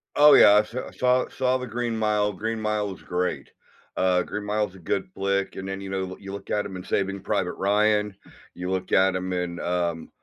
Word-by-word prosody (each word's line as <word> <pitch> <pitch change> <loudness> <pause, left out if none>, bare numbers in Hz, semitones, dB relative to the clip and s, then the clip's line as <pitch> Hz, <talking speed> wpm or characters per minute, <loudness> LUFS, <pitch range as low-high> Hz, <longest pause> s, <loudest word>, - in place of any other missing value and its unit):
Oh, 150 0 +8
yeah, - - +8
I 105 - +7
s 105 +2 -3
I 130 - -4
saw 125 0 +2
saw 130 0 0
The 125 - -5
Green 120 0 -2
Mile, 105 -1 +1
Green 110 +4 -3
Mile 105 -2 -1
is - - -15
great. 90 +1 -2 0.5
Uh, 90 -1 +3
Green 105 - -5
Mile 105 0 0
is 95 - -17
a - - -13
good 95 +3 -2
flick, 100 0 -1
and 95 - -6
then, 95 0 -4
you 95 - -7
know, 95 0 -2
l - - -8
you 100 -1 -8
look 100 - -8
at 105 - 0
him 95 - -7
in 90 - -7
Saving 100 +1 -1
Private 95 -3 -1
Ryan, 105 0 +1 0.4
you 90 +1 -5
look 95 -1 -3
at 95 0 +4
him 95 0 -3
in, 90 -1 -3
um, 85 -2 -2
100 Hz, 235 wpm, -25 LUFS, 95-105 Hz, 0.5 s, Oh